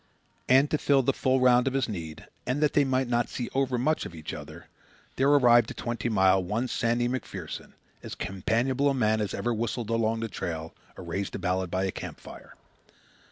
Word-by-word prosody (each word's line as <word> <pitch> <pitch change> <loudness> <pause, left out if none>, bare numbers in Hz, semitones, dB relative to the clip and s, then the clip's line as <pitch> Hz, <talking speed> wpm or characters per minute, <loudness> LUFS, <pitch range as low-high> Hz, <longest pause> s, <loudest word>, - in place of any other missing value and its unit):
And 135 +3 +6
to 155 - +1
fill 140 -2 +3
the 135 - +2
full 130 0 +1
round 125 0 +4
of 135 - 0
his 135 - +1
need, 85 -8 -7 0.2
and 130 +3 0
that 150 - +2
they 145 - +4
might 130 -1 0
not 120 -1 0
see 120 - -5
overmuch 135 +2 +1
of 85 - -8
each 80 -1 -7
other, - - -9 0.5
there 135 +2 +2
arrived 120 -5 +5
at - - -8
Twenty 120 0 -3
Mile 95 -3 +3
one 110 +8 -1
Sandy 120 0 0
MacPherson, 130 +1 -6 0.3
as - - -7
companionable 120 +9 0
a 135 - 0
man 110 -3 +2
as 100 -3 -2
ever 120 - -1
whistled 115 0 -3
along 115 0 0
the 115 - -2
trail 80 -5 -5 0.2
or - - -8
raised 95 +3 -4
a - - -2
ballad 95 0 -1
by 95 +2 -1
a 95 - 0
camp - - -8
fire. - - -13
120 Hz, 205 wpm, -27 LUFS, 95-130 Hz, 0.5 s, And